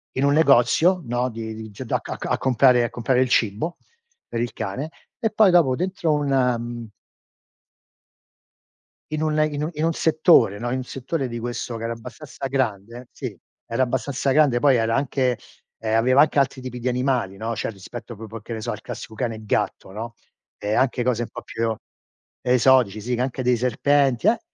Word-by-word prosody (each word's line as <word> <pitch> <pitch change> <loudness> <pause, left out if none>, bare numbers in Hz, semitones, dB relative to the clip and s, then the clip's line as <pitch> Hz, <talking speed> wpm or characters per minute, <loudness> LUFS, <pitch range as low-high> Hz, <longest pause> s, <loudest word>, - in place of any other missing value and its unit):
in 130 - 0
un 140 - +4
negozio, 160 +5 +4
no, 120 +1 -1
di 110 -1 -6
di 110 0 -8
giu 105 +5 -8
da - - 0
a - - -12
ca - - -6
ca - - -5
a - - +1
comprare 125 -1 +4
a 120 - -1
comprare 125 +1 +1
il 130 - +1
cibo 115 - 0 0.5
per 115 - -3
il 120 - -2
cane 130 +11 -4 0.3
e 225 -3 +1
poi 210 -3 +5
dopo 155 -8 +4
dentro 175 -1 -1
un, 145 -1 0 0.3
mhmm 120 -1 -6 2.2
in 155 0 -2
un 155 -1 +1
in 145 0 -3
un 155 - -1
in 155 +2 -1
un 165 - +1
settore, 155 - +4
no, 120 - -3
in 130 - -1
un 130 - -3
settore 135 +2 -3
di 120 - -5
questo 120 0 -4
che 115 - -7
era 115 - -2
abbastanza 130 +4 -9
grande 120 -2 -2
sì. - - -6 0.3
Era 115 +3 0
abbastanza 130 +2 -1
grande, 135 -4 +4
poi 140 -1 +4
era 115 0 +1
anche, 130 -3 0 0.4
ehm, 110 0 -1
aveva 130 +4 +5
anche 150 -1 +3
altri 135 -1 +1
tipi 125 -1 -6
di 125 - -3
animali, 125 -6 0
no, 115 +2 -3
cioè - - -2
rispetto 115 +3 -9
proprio 110 +1 -8
a - - -21
che 115 - -11
ne 110 - -4
so - - -3
al - - -6
classico - - -8
cane 115 0 -2
e 110 0 -11
gatto, 95 - -1
no, 115 +4 -6 0.4
ehm, 105 +1 -1
anche 125 -1 +1
cose 120 -1 +1
un 115 - -7
po' - - -8
più 115 0 -2 0.7
esotici, 125 -4 +4
sì 120 +3 -1
che 125 - -2
anche 130 0 -2
dei 125 0 +3
serpenti, 135 - +2
eh! 230 +2 +4
125 Hz, 205 wpm, -23 LUFS, 115-140 Hz, 2.2 s, poi